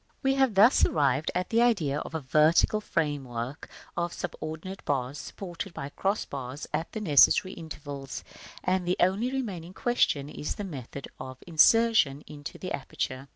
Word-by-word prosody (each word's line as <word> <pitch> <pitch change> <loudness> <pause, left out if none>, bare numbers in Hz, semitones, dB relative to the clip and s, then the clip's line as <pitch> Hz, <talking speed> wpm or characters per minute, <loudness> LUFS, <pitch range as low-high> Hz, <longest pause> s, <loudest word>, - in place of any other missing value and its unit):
§ - - -41
IX. - - -37
We 270 0 +3
have 265 -5 +2
thus 215 +7 +6
arrived 140 -1 +2
at 180 0 -1
the 230 +1 +4
idea 170 -13 +2
of 160 - -7
a - - 0
vertical 155 +9 +3
frame 150 -7 -1
work 120 +3 -6 0.3
of 170 0 -1
subordinated 175 +2 -6
bars, 135 0 -2
supported 175 +1 -7
by 140 - -5
cross 195 +7 -1
bars 135 +1 -6
at 160 +3 -2
the 220 - -3
necessary 185 +2 +5
intervals, 145 -4 -7 0.4
and 185 -1 0
the 180 - +1
only 200 +8 +2
remaining 190 -10 -4
question 240 - +1
is 150 0 -5
the 205 - -5
method 140 -6 -7
of 130 -1 -7
insertion 170 -3 +4
into 145 -2 -9
the 185 - -6
aperture. 135 -1 -4
160 Hz, 170 wpm, -28 LUFS, 140-195 Hz, 0.4 s, thus